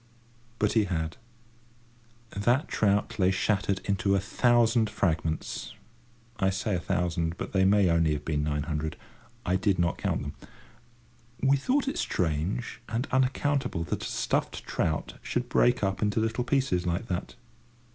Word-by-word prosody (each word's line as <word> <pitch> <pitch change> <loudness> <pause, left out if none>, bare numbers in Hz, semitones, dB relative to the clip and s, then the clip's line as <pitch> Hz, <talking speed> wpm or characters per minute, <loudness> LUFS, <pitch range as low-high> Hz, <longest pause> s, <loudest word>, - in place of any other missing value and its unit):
But - - +1
he 110 -3 +3
had. 80 -3 -3 1.1
That 120 +8 +1
trout 105 0 +1
lay 95 -1 +4
shattered 100 0 0
into 100 0 +1
a - - +3
thousand 115 +2 +3
fragments—I 115 +6 -3
say 95 +2 -1
a - - 0
thousand, 85 -2 -1
but - - -6
they 95 -1 +4
may 100 +1 +5
have 85 -2 +3
only 80 -2 +2
been 75 0 -2
nine 75 -1 -1
hundred. 75 0 -3 0.5
I 90 +1 +2
did 95 0 +1
not 85 0 0
count - - -1
them. - - -5 1.1
We 135 +1 +4
thought 265 - +1
it 275 - -1
strange 90 +10 -1
and 115 +3 -1
unaccountable 130 - +1
that - - -3
a - - -3
stuffed - - -1
trout 80 -1 -2
should 125 0 -2
break 125 -2 +3
up 95 -1 0
into 105 0 +1
little 115 +2 0
pieces 125 -10 +1
like 85 +6 -1
that. 90 -1 -3
100 Hz, 150 wpm, -28 LUFS, 85-120 Hz, 1.1 s, may